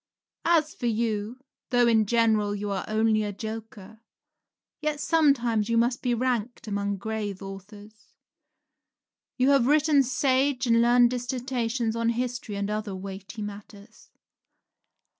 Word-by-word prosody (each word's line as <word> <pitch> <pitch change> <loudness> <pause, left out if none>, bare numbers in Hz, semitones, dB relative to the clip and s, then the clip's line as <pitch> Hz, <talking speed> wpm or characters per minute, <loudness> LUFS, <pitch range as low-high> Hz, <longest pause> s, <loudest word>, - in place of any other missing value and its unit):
As 315 -3 +3
for 245 - -3
you, 225 +1 -2 0.3
though 245 -1 +3
in 220 -3 +3
general 220 -2 +2
you 205 0 -4
are 195 - -3
only 220 0 +2
a 205 -1 -2
joker, 220 0 -8 0.8
yet 305 -1 -1
sometimes 245 -10 +2
you 230 - +2
must 240 +2 +1
be 245 -2 0
ranked 240 -1 -2
among 200 -1 -2
grave 205 -1 -4
authors. 205 +2 -11 1.3
You 260 +2 +3
have 270 -3 +4
written 300 0 +4
sage 265 +1 +1
and 230 -1 +4
learned 240 0 +5
dissertations 245 -2 -2
on 230 0 0
history 245 -2 -3
and 200 +1 -2
other 210 -2 -3
weighty 195 +3 -7
matters. 205 +1 -11
230 Hz, 130 wpm, -26 LUFS, 210-250 Hz, 1.3 s, learned